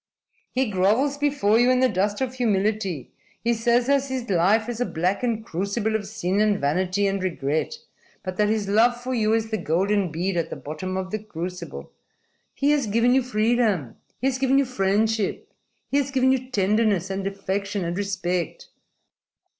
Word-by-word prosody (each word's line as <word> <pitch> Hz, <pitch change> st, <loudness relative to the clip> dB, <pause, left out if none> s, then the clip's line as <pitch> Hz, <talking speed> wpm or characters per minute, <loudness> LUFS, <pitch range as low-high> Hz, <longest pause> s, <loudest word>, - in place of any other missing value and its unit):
"He 260 Hz, 0 st, +1 dB
grovels 215 Hz, +9 st, +2 dB
before 280 Hz, -7 st, +2 dB
you 245 Hz, +1 st, +4 dB
in 255 Hz, 0 st, +4 dB
the 260 Hz, -, +5 dB
dust 205 Hz, +1 st, -1 dB
of 255 Hz, -1 st, -1 dB
humility. 210 Hz, -, -1 dB, 0.3 s
He 235 Hz, +1 st, +2 dB
says 235 Hz, +1 st, +2 dB
that 275 Hz, 0 st, +2 dB
his 260 Hz, -3 st, -4 dB
life 200 Hz, +6 st, +3 dB
is 240 Hz, 0 st, -4 dB
a -, -, +2 dB
blackened 215 Hz, +7 st, -1 dB
crucible 200 Hz, +4 st, -1 dB
of 205 Hz, -2 st, -2 dB
sin 205 Hz, -2 st, -1 dB
and 210 Hz, -2 st, +2 dB
vanity 185 Hz, +7 st, +1 dB
and 195 Hz, -1 st, 0 dB
regret, 160 Hz, -, -1 dB, 0.5 s
but 185 Hz, 0 st, -4 dB
that 210 Hz, 0 st, +3 dB
his 215 Hz, -2 st, 0 dB
love 235 Hz, +4 st, +3 dB
for 255 Hz, +1 st, -4 dB
you 220 Hz, -2 st, +2 dB
is 225 Hz, 0 st, -2 dB
the 220 Hz, -, -1 dB
golden 185 Hz, +3 st, +1 dB
bead 175 Hz, +3 st, -1 dB
at 165 Hz, -, -1 dB
the -, -, -5 dB
bottom 185 Hz, +6 st, -5 dB
of 185 Hz, 0 st, -4 dB
the 215 Hz, -, -2 dB
crucible. 180 Hz, -3 st, -7 dB, 0.6 s
He 280 Hz, +1 st, +2 dB
has 285 Hz, -6 st, +1 dB
given 230 Hz, +4 st, +3 dB
you 265 Hz, -, +4 dB
freedom. 220 Hz, -, +1 dB, 0.2 s
He -, -, -3 dB
has 265 Hz, -1 st, +1 dB
given 270 Hz, 0 st, +3 dB
you 275 Hz, -, +4 dB
friendship. 215 Hz, -2 st, 0 dB, 0.4 s
He 280 Hz, -, +2 dB
has 280 Hz, -1 st, +1 dB
given 260 Hz, -1 st, +3 dB
you 255 Hz, -1 st, -1 dB
tenderness 205 Hz, -3 st, +1 dB
and 195 Hz, 0 st, -2 dB
affection 195 Hz, 0 st, -3 dB
and 170 Hz, +1 st, -2 dB
respect." 195 Hz, -, -3 dB
215 Hz, 180 wpm, -24 LUFS, 190-245 Hz, 0.6 s, the